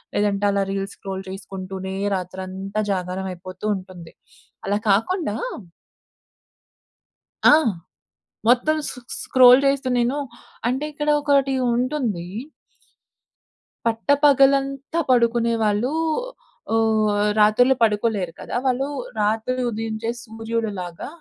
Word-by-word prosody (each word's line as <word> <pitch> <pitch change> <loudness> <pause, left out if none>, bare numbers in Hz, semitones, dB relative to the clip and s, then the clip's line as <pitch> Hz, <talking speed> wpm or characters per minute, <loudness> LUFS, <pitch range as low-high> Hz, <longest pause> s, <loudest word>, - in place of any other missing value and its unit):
లేదంటే 205 -1 +1
అలా 200 0 +1
reels 195 0 -4
scroll 190 -1 -6
చేసుకుంటూనే 190 0 -6 0.2
రాత్రంతా 190 +3 -5
జాగారం 185 +1 -3
అయిపోతూ 185 +3 -9
ఉంటుంది. 185 -3 -11 0.5
అలా 205 +1 +1
కాకుండా 225 - +1 2.1
ఆ! - - +9 1.0
మొత్తం 255 +6 +4
సొ - - -6
సొ 250 - -11 0.2
స్క్రోల్ 260 - +7
చేస్తు 275 -1 +1
నేను 245 +4 +1 0.5
అంటే, 260 +4 -1
ఇక్కడ 295 +1 -4
ఒకటి 280 -2 +2 0.2
ఉంటుంది. 245 - -1 1.6
పట్ట 225 0 -1 0.2
పగలంతా 275 +2 +3
పడుకునే 235 -1 +3
వాళ్ళూ 210 +5 +1 0.8
ఆహ్, 220 -1 +2 0.3
రాత్రులు 230 +5 +5
పడుకోలేరు 210 -5 +1
కదా! - - -6
వాళ్ళు 260 +1 +1 0.3
రాత్రి 220 +4 0 0.2
ఉదయించే 225 0 -3
సూర్యుడు‌లాగా 220 -6 -4
220 Hz, 95 wpm, -22 LUFS, 195-255 Hz, 2.1 s, ఆ